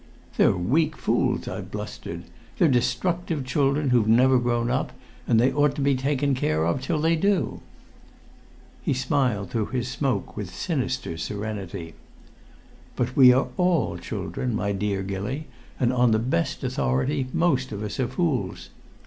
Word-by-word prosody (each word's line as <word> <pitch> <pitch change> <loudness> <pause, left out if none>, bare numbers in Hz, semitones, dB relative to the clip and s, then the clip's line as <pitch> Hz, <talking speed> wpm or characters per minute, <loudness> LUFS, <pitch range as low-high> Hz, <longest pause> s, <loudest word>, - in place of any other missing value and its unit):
"They're - - +4
weak 150 - +1
fools," - - 0
I - - -4
blustered. 85 +1 -7 0.3
"They're 170 - +4
destructive 145 +4 0
children 140 +1 +1
who've 120 -4 +3
never 125 +3 +5
grown 120 0 0
up, 130 - -1 0.3
and 115 -2 +4
they 130 +3 +3
ought 145 -1 +2
to 145 - -3
be 140 0 +3
taken 140 +1 0
care 80 -11 0
of 85 +10 0
till 140 +4 -1
they 165 +2 +3
do." 185 - 0 1.2
He - - 0
smiled 125 -8 0
through 110 -3 -1
his 125 -1 -2
smoke 130 -6 -2
with 105 -3 -5
sinister 130 - -2
serenity. 100 -5 -5 1.0
"But 125 +1 -2
we 130 -2 +8
all 170 +7 +1
are - - -7
children, 125 -4 -3
my 100 -2 -1
dear 100 0 -1
Gilly, 100 +10 -4 0.3
and 125 -1 +2
on 125 -1 +4
the 110 - +3
best 110 -7 -1
authority 130 - 0
most 135 -7 +1
of 105 0 -4
us 105 +3 -5
are 130 - +1
fools. 130 - -2
125 Hz, 155 wpm, -25 LUFS, 105-140 Hz, 1.2 s, we